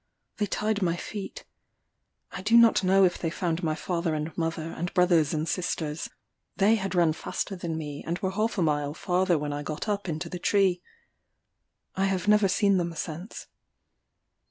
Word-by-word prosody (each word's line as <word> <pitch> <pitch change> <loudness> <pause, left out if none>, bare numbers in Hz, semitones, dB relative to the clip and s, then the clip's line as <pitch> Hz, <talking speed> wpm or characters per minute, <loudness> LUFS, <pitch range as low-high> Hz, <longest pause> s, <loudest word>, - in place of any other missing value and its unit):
They 210 - 0
tied 210 +2 -1
my 170 -2 +1
feet. 200 +2 -7 0.9
I - - -6
do 225 +4 +4
not 230 -4 +6
know 190 +1 +5
if 175 - 0
they 165 - -1
found 170 0 -2
my 155 -3 0
father 170 0 -2
and 155 +1 -4
mother, 165 -1 -2
and 175 +2 -4
brothers 175 -5 +4
and 155 +1 -1
sisters: 160 -4 -2 0.5
they 205 +2 +4
had 195 -4 -1
run 170 -3 +4
faster 195 - -4
than 170 -3 -4
me, 145 -2 -6
and 170 +1 -1
were 190 0 -2
half 215 +3 -1
a 180 - +2
mile 145 -1 0
farther 180 -1 +1
when 145 0 -3
I 145 - -3
got 155 +7 -5
up 200 -3 -2
into 160 +2 -3
the 180 +1 -6
tree: 190 -2 +2 1.1
I 190 - +1
have 190 -1 -1
never 210 -1 +5
seen 200 +1 +3
them 170 -2 -2
since. 170 +5 -6
175 Hz, 180 wpm, -27 LUFS, 160-195 Hz, 1.1 s, not